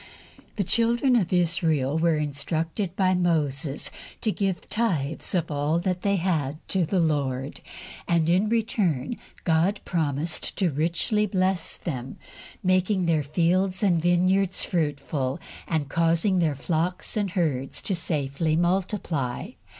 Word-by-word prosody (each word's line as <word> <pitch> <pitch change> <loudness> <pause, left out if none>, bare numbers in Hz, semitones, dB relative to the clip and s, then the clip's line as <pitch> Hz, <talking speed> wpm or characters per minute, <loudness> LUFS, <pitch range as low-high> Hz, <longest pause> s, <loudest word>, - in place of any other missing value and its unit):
THE 205 - 0
children 235 +6 +2
of 195 -8 +1
Israel 165 -6 +1
were 165 -1 +2
instructed 160 +5 -2
by 185 -1 +3
Moses 155 -5 0 0.3
to 220 - +2
give 195 -3 -2
tithes 165 -9 -1
of 165 -3 0
all 145 +3 +1
they 185 +2 0
had 160 -6 0
to 185 -4 +1
the 190 +2 +1
Lord, 140 -4 -1 0.5
and 170 -2 +2
in 185 +5 +3
return 215 - 0 0.2
God 170 +4 +2
promised 160 -1 -1
to 185 -5 +2
richly 170 - +1
bless 185 -2 0
them, 130 -6 -5 0.5
making 185 0 +2
their 165 -2 +2
fields 185 +6 +1
and 175 -5 +3
vineyards 185 +2 +2
fruitful 145 -5 -1 0.3
and 155 -4 -1
causing 170 +5 +2
their 160 -4 +1
flocks 165 +5 -2
and 205 -2 0
herds 155 -8 -1
to 200 - 0
safely 155 -2 -1
multiply. 175 - -1
170 Hz, 125 wpm, -25 LUFS, 150-190 Hz, 0.5 s, by